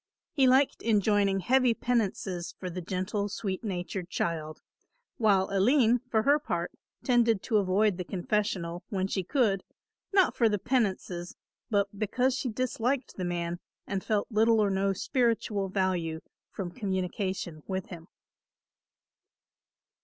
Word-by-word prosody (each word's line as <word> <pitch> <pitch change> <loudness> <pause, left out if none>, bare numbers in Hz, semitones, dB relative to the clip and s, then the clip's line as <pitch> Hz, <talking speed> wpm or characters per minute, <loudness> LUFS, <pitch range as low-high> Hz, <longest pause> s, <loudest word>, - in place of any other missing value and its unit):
He 275 -4 +3
liked 260 +2 +3
enjoining 205 -3 +2
heavy 255 +3 +3
penances 195 -8 -1
for 185 -1 -5
the 180 +1 -5
gentle 190 +3 -2
sweet 195 0 -4
natured 180 -2 -4
child; 155 -2 -2 0.6
while 200 -4 +3
Aline, 235 +4 +4
for 220 -2 +2
her 290 +4 +4
part, - - -3 0.3
tended 235 -5 +3
to 220 - +2
avoid 200 0 +2
the 180 - -3
confessional, 180 -2 -2
when 190 -2 -1
she 195 0 -1
could, 200 - +1 0.5
not 390 -2 +4
for 230 -2 +4
the 210 - +1
penances, 190 -6 -1 0.3
but 205 -2 +2
because 250 +5 +1
she 260 -1 -2
disliked 255 +3 -1
the 185 - -2
man 175 0 -2 0.3
and 195 -2 -3
felt 215 +2 -1
little 225 +1 +4
or 205 -2 +3
no 195 +1 +1
spiritual 215 -2 0
value 180 -4 -1 0.3
from 185 -3 -5
communication 190 -4 -3
with 190 -1 -3
him. 170 -2 -9
200 Hz, 135 wpm, -29 LUFS, 185-230 Hz, 0.6 s, Aline